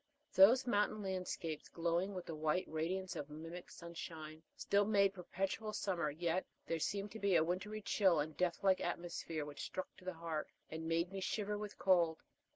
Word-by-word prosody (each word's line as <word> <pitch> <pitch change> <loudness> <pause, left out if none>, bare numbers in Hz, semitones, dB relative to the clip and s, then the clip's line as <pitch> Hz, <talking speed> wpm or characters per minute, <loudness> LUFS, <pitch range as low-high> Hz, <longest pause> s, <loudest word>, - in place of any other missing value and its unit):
Those 225 +8 +8
mountain 210 -2 +1
landscapes, 180 -4 -3
glowing 175 +4 0
with 180 - -4
the 165 - -5
white 155 +3 +1
radiance 180 +4 -2
of 145 - -4
mimic 165 +4 -7
sunshine, 160 -2 -7
still 200 0 +3
made 200 -2 +4
perpetual 195 +3 -3
summer; 180 -7 0
yet 170 +4 0 0.2
there 165 - -1
seemed 200 +5 -1
to 220 - -7
be 200 -3 +3
a 160 - +6
wintry 195 +5 -2
chill 190 -7 +4
and 150 +1 -2
death 180 0 0
like 190 -1 +4
atmosphere 170 -3 -3
which 145 -1 -7
struck 185 - -5
to 185 - -15
the 185 -1 -3
heart, 160 -2 -3 0.2
and 160 +1 -4
made 170 +2 +1
me 195 - -4
shiver 210 +2 -1
with 205 0 -5
cold. 170 -4 +4
180 Hz, 180 wpm, -38 LUFS, 165-195 Hz, 0.2 s, Those